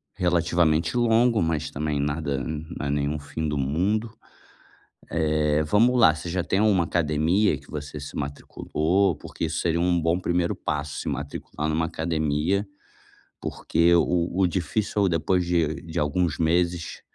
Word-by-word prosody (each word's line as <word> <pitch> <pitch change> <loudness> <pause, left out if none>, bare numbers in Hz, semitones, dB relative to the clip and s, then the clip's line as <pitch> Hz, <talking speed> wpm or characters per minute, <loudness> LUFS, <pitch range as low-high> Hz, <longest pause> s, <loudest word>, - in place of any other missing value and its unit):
relativamente 85 -1 +1
longo, 115 -1 +3
mas 80 -2 -1
também 75 0 -2
nada 70 -1 -1
não 80 -1 -5
é - - -1
nenhum 75 +1 -1
fim 75 +2 -4
do 75 - -2
mundo. 95 - 0 1.0
Eh, 75 -2 +1
vamos 115 +10 +3
lá, 80 -9 +6
você 85 +2 -6
já 90 0 -1
tem 95 - +1
uma 100 -6 +3
academia 80 +3 +1
que 70 - -18
você 75 0 -6
se 70 - -8
matriculou? 80 +5 -1
Porque - - -8
isso 80 - -2
seria 85 -1 0
um 90 -1 +2
bom 85 +2 +2
primeiro 85 -1 0
passo, 75 0 -3
se - - -7
matricular 75 +1 -4
numa 80 +1 +1
academia, 80 +4 0 0.7
porque 85 +1 +1
o 85 0 +2
o 95 - +4
difícil 100 +3 -1
é - - +4
o - - +2
depois 90 +2 +1
de 85 -3 +1
de 85 +1 -4
alguns 75 +1 0
meses 85 +1 0
80 Hz, 155 wpm, -25 LUFS, 75-90 Hz, 1.0 s, lá